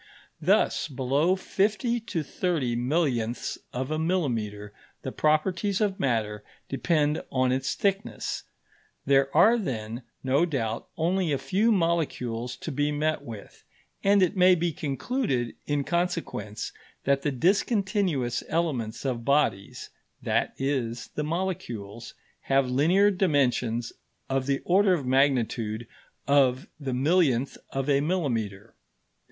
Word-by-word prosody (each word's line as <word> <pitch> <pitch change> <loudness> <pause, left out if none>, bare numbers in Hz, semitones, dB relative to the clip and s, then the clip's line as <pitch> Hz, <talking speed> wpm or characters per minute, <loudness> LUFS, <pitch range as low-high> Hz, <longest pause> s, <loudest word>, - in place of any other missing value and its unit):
Thus, - - +2
below 140 +7 +1
fifty 210 +5 0
to 200 -8 -3
thirty 150 -6 -1
millionths 125 -3 -1
of 130 +3 -3
a 155 - 0
millimetre 115 - -1 0.3
the - - -4
properties 180 +6 +1
of 205 -3 0
matter 110 -5 -1 0.2
depend 150 +1 +1
on 130 -1 +2
its 130 +1 -1
thickness. 200 +1 -2 0.6
There 135 0 +4
are 225 +8 +6
then, 115 - -4 0.2
no 135 +4 +3
doubt, 115 -7 -2
only 175 +1 +1
a 140 - +2
few 190 - +1
molecules 145 - 0
to 160 - -4
be 145 +1 0
met 155 0 0
with, 115 -7 -10 0.4
and 200 0 +5
it 185 +3 +1
may 185 0 +6
be 170 -1 -1
concluded, 140 - -2
in 145 -1 0
consequence, 165 - -2 0.3
that 140 0 +2
the 145 - 0
discontinuous 185 - +1
elements 140 -9 -1
of 120 -3 -2
bodies 140 -8 0 0.3
that - - 0
is, 130 -4 -2
the 150 - -2
molecules 120 - -4 0.3
have 135 -1 +3
linear 170 +11 +4
dimensions 125 - +1 0.4
of 135 0 0
the 140 -1 0
order 190 +1 +4
of 145 -6 -4
magnitude 120 -4 +1 0.4
of 135 -2 +3
the 135 -4 -3
millionth 140 -3 +2
of 135 0 -3
a 140 -1 +3
millimetre. 115 - -2
140 Hz, 125 wpm, -27 LUFS, 125-175 Hz, 0.6 s, are